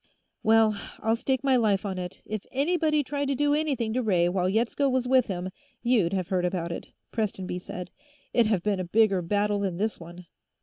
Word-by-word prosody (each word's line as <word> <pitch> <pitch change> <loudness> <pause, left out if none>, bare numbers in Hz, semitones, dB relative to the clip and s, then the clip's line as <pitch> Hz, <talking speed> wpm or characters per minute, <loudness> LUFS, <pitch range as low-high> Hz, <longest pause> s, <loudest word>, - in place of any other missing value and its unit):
"Well, 220 -1 +4 0.2
I'll 225 +1 +2
stake 260 +2 -1
my 270 -2 +4
life 210 -4 +2
on 190 -2 -3
it; 180 0 -7
if 215 -1 -4
anybody 305 +1 +1
tried 285 +1 -2
to 275 - 0
do 290 +1 +2
anything 275 -8 0
to 255 - +1
Ray 180 -7 +2
while 180 0 0
Yetsko 235 +7 +1
was 255 -1 0
with 255 -1 +4
him, 185 -2 -4 0.3
you'd 230 -8 +3
have 185 -3 -2
heard 185 -2 +1
about 175 -1 -1
it," - - -6 0.2
Prestonby 190 -5 -2
said. 180 0 -7 0.4
"It'd 230 -3 +4
have 195 -5 +1
been 205 -2 0
a - - -1
bigger 195 +1 +3
battle 205 +3 0
than 190 -4 -2
this 215 +3 -1
one." 175 +1 -11
215 Hz, 205 wpm, -27 LUFS, 185-255 Hz, 0.4 s, Well